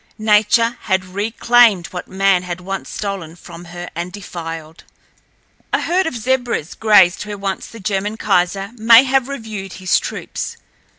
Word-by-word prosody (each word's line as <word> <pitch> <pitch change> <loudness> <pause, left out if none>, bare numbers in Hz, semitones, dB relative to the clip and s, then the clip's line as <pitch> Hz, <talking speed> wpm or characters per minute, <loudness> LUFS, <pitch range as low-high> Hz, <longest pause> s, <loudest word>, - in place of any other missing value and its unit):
Nature 220 +2 +3
had 190 -2 +1
reclaimed 215 0 +3
what 180 -1 -6
man 195 -1 +2
had 180 -1 -5
once 195 +2 -5
stolen 195 -6 -5
from 175 0 -12
her 175 +1 -8
and 175 +2 -5
defiled. 165 -5 -8 0.9
A - - +1
herd 360 +1 +1
of 250 - -3
zebras 245 - -1
grazed 205 -5 +4
where 205 -1 -5
once 195 -1 -4
the 230 - -12
German 205 +1 -2
kaiser 195 -1 0
may 230 +2 +7
have 265 -1 +1
reviewed 220 -8 -6
his 185 -1 +1
troops. - - -6
195 Hz, 145 wpm, -18 LUFS, 180-225 Hz, 0.9 s, may